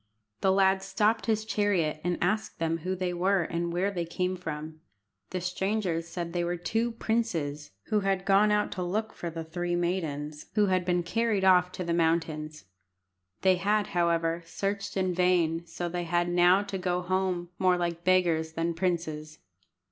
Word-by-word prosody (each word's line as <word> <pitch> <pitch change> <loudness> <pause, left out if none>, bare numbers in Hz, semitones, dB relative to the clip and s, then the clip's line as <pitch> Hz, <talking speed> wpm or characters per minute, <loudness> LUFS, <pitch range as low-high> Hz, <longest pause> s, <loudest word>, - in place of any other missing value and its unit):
The 190 - +3
lad 190 0 +3
stopped 215 +4 +1
his 220 -1 +1
chariot 190 -8 0
and 175 0 0
asked 210 +5 -1
them 165 0 -1
who 185 +3 -2
they 180 -1 -2
were 185 +1 +2
and 170 +1 -2
where 185 +4 0
they 175 -3 -2
came 180 +2 -2
from. 155 -2 -6 0.5
The 185 - -3
strangers 180 -2 -1
said 170 0 -5
they 175 -1 0
were 175 +1 -1
two 225 +7 -1
princes 170 -12 -2 0.2
who 215 - +3
had 195 -1 0
gone 200 +2 +5
out 210 0 +1
to 185 - -4
look 215 +5 -2
for 170 - -5
the 165 0 -5
three 175 +2 -2
maidens 155 -4 -2
who 210 -1 +4
had 185 -2 +1
been 175 -1 +1
carried 215 +1 0
off 180 -1 +5
to 185 - -4
the 170 -1 -1
mountains. 160 - 0 0.8
They 185 -1 +4
had, 205 +2 +1
however, 170 -1 +1
searched 200 +3 -3
in 185 -1 +1
vain, 170 -2 +2
so 175 +1 -4
they 175 0 -3
had 175 +1 +1
now 175 +3 +5
to 200 -2 -5
go 180 -1 -1
home 185 -1 -1
more 185 -1 +3
like 170 -1 -2
beggars 170 -4 +2
than 165 +1 -1
princes. 160 -3 -2
180 Hz, 180 wpm, -28 LUFS, 170-190 Hz, 0.8 s, gone